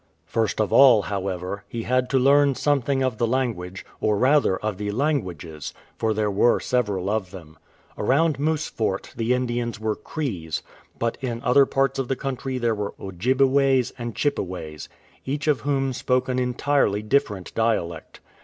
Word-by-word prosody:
First 115 -1 -1
of 105 -4 0
all, 125 -7 +7
however, 95 0 -4
he 115 +2 -5
had 125 +1 +1
to 135 - +2
learn 140 +1 +4
something 140 -1 +1
of 130 -4 -1
the 115 - +2
language, 110 -8 -2
or 105 -1 +1
rather 130 -5 +3
of 105 -3 -3
the 105 -1 -2
languages, 95 - -2 0.2
for 110 - 0
there 105 -1 0
were 105 +5 +3
several 105 -7 -1
of 105 -3 -1
them. 80 -4 -12 0.4
Around 140 +6 +2
Moose 155 +1 0
Fort 100 -4 -3
the 115 +2 +1
Indians 120 -2 -2
were 110 -1 -1
Crees, 95 - -4 0.3
but 115 0 -2
in 120 -3 -3
other 135 +2 +5
parts 135 0 0
of 135 - -1
the 135 - 0
country 130 0 -4
there 120 -2 +1
were 105 -1 -4
Ojji 95 +7 -1
beways 135 -2 +3
and 120 -3 -6
Chippeways, 90 - -3 0.3
each 145 +2 -3
of 150 -3 +2
whom 135 -2 0
spoke 125 +1 0
an 130 0 0
entirely 125 -4 +1
different 105 -6 0
dialect. 85 -8 -2
120 Hz, 165 wpm, -24 LUFS, 100-135 Hz, 0.4 s, all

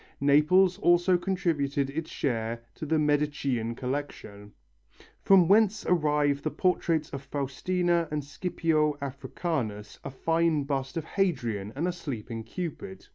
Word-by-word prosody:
Naples 155 +7 +4
also 175 +1 +4
contributed 155 -7 -1
its 160 +2 -4
share 115 -3 -2
to 155 - -7
the 160 +2 +2
Medicean 145 -6 0
collection, 125 -6 -5 0.7
from 190 -3 +5
whence 210 +1 +3
arrive 150 -4 +2
the 155 - -1
portraits 165 -3 0
of 140 - -5
Faustina 170 +5 -1
and 150 -1 -2
Scipio 155 0 0
Africanus, 130 - -4
a - - -5
fine 165 +2 +1
bust 135 0 -3
of 165 - -3
Hadrian 120 - -1
and 160 +6 -1
a - - +1
sleeping 120 -9 -6
Cupid. 180 - -7
150 Hz, 130 wpm, -28 LUFS, 135-175 Hz, 0.7 s, from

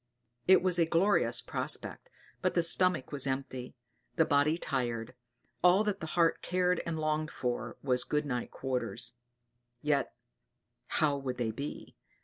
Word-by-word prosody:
It 185 -1 +6
was 180 -2 +2
a 165 - +4
glorious 185 +5 +3
prospect; - - -3 0.3
but - - 0
the 170 - +3
stomach 170 -3 +3
was 140 -2 -1
empty, 130 -1 -4 0.4
the 160 - +4
body 145 +3 +3
tired; 120 -7 -2 0.5
all 180 +4 +6
that 205 -2 -1
the 160 - -5
heart 165 -1 +3
cared 180 0 +1
and 165 -1 -2
longed 155 0 -1
for 120 -4 -3
was 125 -2 +2
good 150 0 -1
night 125 -4 -3
quarters; 120 -3 -2 0.7
yet 145 -4 0 0.7
how 145 -2 +1
would 130 -2 -4
they 115 -2 -1
be? 140 +6 -7
145 Hz, 145 wpm, -31 LUFS, 125-170 Hz, 0.7 s, It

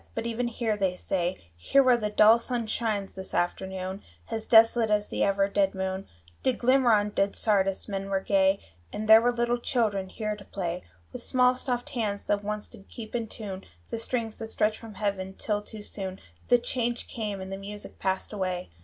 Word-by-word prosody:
But 225 - -2
even 235 +1 -1
here, 230 -2 -1
they 190 -3 0
say, 180 -1 -1 0.2
Here 275 - +3
where 255 -1 +6
the 215 -3 -1
dull 215 +2 +6
sun 240 -1 -2
shines 215 -3 -2
this 190 0 -7
afternoon 190 +2 -2 0.3
As 220 -1 -3
desolate 225 0 +6
as 210 0 0
ever 195 0 +2
the 200 - -15
dead 195 -1 +2
moon 190 0 -3 0.3
Did 260 - +1
glimmer 255 0 +4
on 210 -1 +3
dead 200 -1 +1
Sardis, 195 -3 +1
men 195 -1 -4
were 195 -1 +1
gay; 195 0 +3 0.3
And 215 - -4
there 220 +1 +9
were 245 +1 +3
little 240 0 0
children 210 -6 0
here 215 +1 -3
to 205 - -12
play, 180 -3 -4 0.3
With - - -6
small 250 0 +3
soft 250 -1 -2
hands 210 -5 -2
that 205 0 0
once 210 0 -3
did 195 - -16
keep 220 -2 -9
in 235 -2 -1
tune 195 -4 -7 0.3
The - - -2
strings 225 -1 -3
that 225 - -4
stretch 215 -1 +1
from 225 -3 -10
heaven, 190 -2 -2
till 210 -1 -1
too 210 0 -9
soon 190 -2 -6 0.3
The 245 - +6
change 240 0 -2
came, 210 -4 -4
and 190 0 -7
the 195 - -3
music 205 +1 -9
passed 190 +2 -1
away. 185 - -3
210 Hz, 200 wpm, -28 LUFS, 195-230 Hz, 0.3 s, there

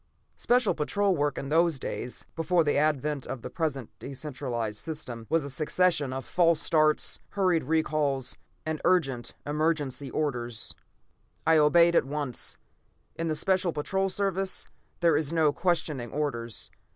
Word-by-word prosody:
Special 245 -3 +3
Patrol 195 +6 +1
work 145 -2 0
in 140 - -4
those 165 0 +3
days, 125 -1 -5
before 170 +1 +2
the 145 - +1
advent 150 -1 +1
of 130 -3 -5
the - - -6
present 140 -8 -2
de 135 - -7
centralized 125 -6 -4
system, 125 -8 -6
was 165 -2 +2
a 140 - -5
succession 155 -1 +1
of 130 0 -4
false 170 -3 +3
starts, 155 -2 +2
hurried 185 -7 +2
recalls, 150 -3 +1 0.3
and 155 -1 -2
urgent, 135 -10 +1
emergency 145 -3 -1
orders. 120 -6 -2 0.7
I 160 0 +5
obeyed 170 +3 +6
at - - +4
once. 140 -3 -3 0.6
In 165 - -2
the 155 - 0
Special 185 +2 +1
Patrol 190 +6 -1
service, 195 0 0 0.4
there 170 -3 +4
is 150 0 0
no 160 -3 +3
questioning 155 -8 -1
orders. 120 -6 -3
150 Hz, 145 wpm, -28 LUFS, 135-170 Hz, 0.7 s, obeyed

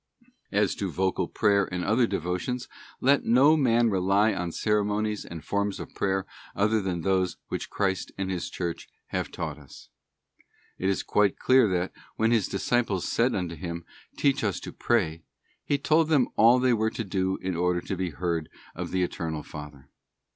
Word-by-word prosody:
As 105 0 +2
to 100 - -2
vocal 95 +1 0
prayer 100 -3 +2
and 90 -1 -2
other 115 +3 +3
devotions, 100 +7 -2 0.3
let 140 +2 +4
no 135 +7 +5
man 120 -5 +3
rely 100 +3 +3
on 90 -2 -3
ceremonies 105 +1 0
and 85 -2 -9
forms 100 0 -1
of - - -8
prayer 95 -1 0 0.3
other 105 +2 +2
than 90 -3 -2
those 95 0 +1
which - - -4
Christ 95 -2 -1
and 95 -1 -2
His 90 -2 -3
Church 85 -2 -4 0.2
have - - -2
taught 75 -2 -5
us. 70 - -14 0.9
It 95 - +1
is 100 - 0
quite 105 -2 +2
clear 130 -3 +5
that, 90 -1 -1 0.2
when 110 +1 +2
His 115 -5 +2
disciples 100 -2 0
said 120 +3 +2
unto 90 -3 -2
Him, 85 -1 -6 0.2
' - - -30
Teach 140 -3 +2
us 100 -3 0
to - - -8
pray,' 95 -10 +1
t - - -33 0.4
He 145 - +1
told 155 +3 +2
them 145 -6 +3
all 115 +3 +6
they 125 -1 +3
were 110 -1 +1
to 115 - -4
do 95 -1 -1
in 95 -1 -3
order 90 +1 +1
to 95 - -4
be 95 0 -2
heard 85 -1 -2 0.2
of - - -5
the 95 -1 0
Eternal 80 -3 -3
Father. 75 -2 -10
95 Hz, 185 wpm, -27 LUFS, 90-110 Hz, 0.9 s, all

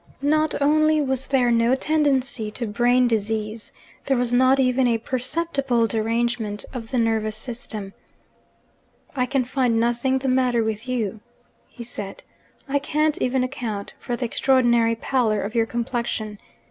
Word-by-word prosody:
Not 310 +2 +2
only 310 +1 +4
was 265 -2 -1
there 255 -3 +2
no 235 +2 +3
tendency 270 -6 0
to 235 +3 -4
brain 245 +4 +3
disease 220 -1 -2 0.4
there 270 -2 +2
was 245 0 0
not 260 +2 +4
even 255 0 +3
a 230 -1 +2
perceptible 255 0 0
derangement 225 -1 -1
of 230 -3 -6
the 260 - -1
nervous 220 -2 0
system. 220 -4 -7 1.2
'I 250 -2 +1
can 270 0 +1
find 250 -3 +1
nothing 240 +3 +1
the 265 +1 -3
matter 255 -2 +2
with 220 +2 -3
you,' 225 -4 -2 0.5
he 240 - -10
said. 205 -4 -7 0.4
'I 285 +1 +1
can't 300 +2 0
even 255 0 +1
account 235 -6 -4
for 245 - -3
the 245 - -3
extraordinary 235 -2 +3
pallor 225 -3 0
of 205 +3 -5
your 230 -1 +2
complexion. 235 -3 -3
245 Hz, 145 wpm, -23 LUFS, 225-265 Hz, 1.2 s, only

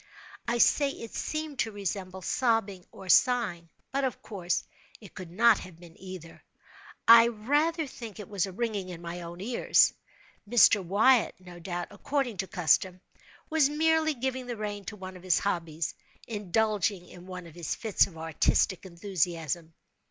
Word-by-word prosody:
I 240 - +1
say 280 +4 +4
it 230 -4 -8
seemed 310 -3 -4
to 225 - 0
resemble 190 -2 -5
sobbing 220 -5 0
or 190 - -12
sighing—but, 235 +2 +1
of 260 -2 -2
course, 180 -5 -2 0.4
it 205 -5 -14
could 185 -2 -8
not 225 +7 +4
have 170 -3 -11
been 170 -1 -14
either. 185 -3 -10 0.7
I 230 0 +9
rather 295 +9 0
think 230 -6 -9
it 210 - -7
was 200 -2 -1
a - - -7
ringing 205 -2 -3
in 175 -1 -8
my 170 +1 -6
own 170 +1 -8
ears. 235 +4 +3 0.6
Mr. 215 -4 +6
Wyatt, 220 +7 +3
no 180 -1 -12
doubt, 175 0 -4
according 245 +1 -2
to 190 - -2
custom, 180 +2 +2 0.5
was 310 -3 +4
merely 315 0 +2
giving 260 0 -3
the 240 -2 -4
rein 205 -1 -5
to - - -6
one 185 -2 -9
of 180 - -11
his 185 -2 +2
hobbies—indulging 195 +3 -2
in 180 +1 -13
one 180 -1 -7
of 165 - -12
his 170 -2 -4
fits 220 -4 +2
of 170 -4 -14
artistic 165 +3 +1
enthusiasm. 170 -3 -2
200 Hz, 160 wpm, -28 LUFS, 175-235 Hz, 0.7 s, I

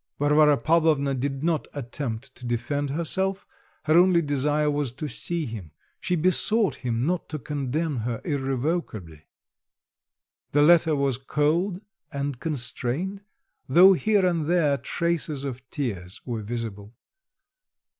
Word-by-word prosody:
Varvara 150 0 +4
Pavlovna 155 0 +2
did 135 +2 -3
not 165 -2 0
attempt 130 -1 -5
to - - -16
defend 135 +5 -2
herself; 190 +6 0 0.4
her 155 +1 +2
only 180 -1 +5
desire 145 +1 0
was 145 -4 -1
to 145 +5 -6
see 170 +2 -2
him, 110 - -7 0.3
she 180 - -1
besought 185 +5 +2
him 120 -1 -2
not 175 +2 -1
to 155 - -3
condemn 145 +2 -2
her 115 0 -3
irrevocably. 135 - -3 1.3
The 145 +1 +5
letter 165 -1 +5
was 140 -3 0
cold 165 +7 0 0.3
and 140 -3 -3
constrained, 155 +6 -3 0.5
though 180 +8 +8
here 205 +1 +2
and 170 -4 0
there 165 -5 +3
traces 165 -3 -2
of 130 -3 -5
tears 100 - -4
were 115 -3 -3
visible. 110 -1 -6
145 Hz, 125 wpm, -25 LUFS, 125-165 Hz, 1.3 s, though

